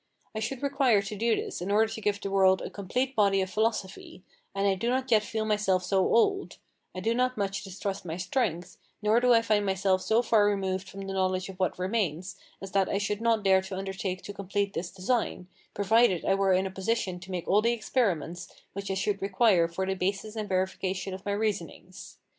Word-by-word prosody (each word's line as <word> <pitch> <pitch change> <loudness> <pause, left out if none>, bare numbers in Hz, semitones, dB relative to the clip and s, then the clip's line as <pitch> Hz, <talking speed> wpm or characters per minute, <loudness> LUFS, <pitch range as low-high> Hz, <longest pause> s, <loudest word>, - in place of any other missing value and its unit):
I 220 - -3
should 245 +5 -4
require 270 -7 +3
to 200 +2 -5
do 225 +2 +2
this - - -5
in 180 - -3
order 220 +2 +2
to 220 - -6
give 205 -1 +1
to - - -3
the - - -5
world 190 -1 +5
a - - -6
complete 250 +7 -2
body 200 -2 +3
of 190 -1 -2
philosophy; 215 -4 -2 0.3
and 195 0 0
I 195 - +3
do 210 +5 -2
not 260 0 -1
yet 220 -2 +6
feel 215 +1 -3
myself 210 -4 +1
so 190 +1 +1
old, 390 - +2 0.4
I 185 - -4
do 225 +4 +1
not 255 +1 +1
so - - -8
much 195 +1 -2
distrust 195 0 -5
my 165 -1 -5
strength, 180 -3 -2 0.3
nor 215 +2 +4
do 250 0 +3
I 230 -1 +5
find 215 -2 +2
myself 190 -1 +1
so 225 +5 +2
far 220 -3 +4
removed 190 -2 -1
from 195 - -8
the 195 0 -5
knowledge 185 -1 0
of 190 -1 -10
what 185 - 0
remains, 185 -3 -2 0.3
as 195 - -7
that 195 -1 +2
I - - 0
should 205 +1 -2
not 230 -2 +2
dare 190 -1 +5
to 190 0 -6
undertake 190 -1 -4
to 205 - -7
complete 200 0 -2
this 175 - -3
design, 195 0 -1 0.3
provided 205 -2 +3
I - - +3
were 195 0 +2
in 185 +1 +2
a 190 - -4
position 190 -1 -2
to 180 +1 -12
make 180 -2 -4
all 205 +2 +4
the 230 +2 +2
experiments 190 - -1 0.3
which 200 0 -5
I 195 - -1
should 200 +1 -1
require 195 -3 +3
for 170 +3 -3
the 190 - 0
basis 195 +3 -2
and 215 -2 -4
verification 185 0 -2
of 190 +2 -8
my 200 - 0
reasonings. 200 -3 -4
195 Hz, 225 wpm, -28 LUFS, 190-220 Hz, 0.4 s, yet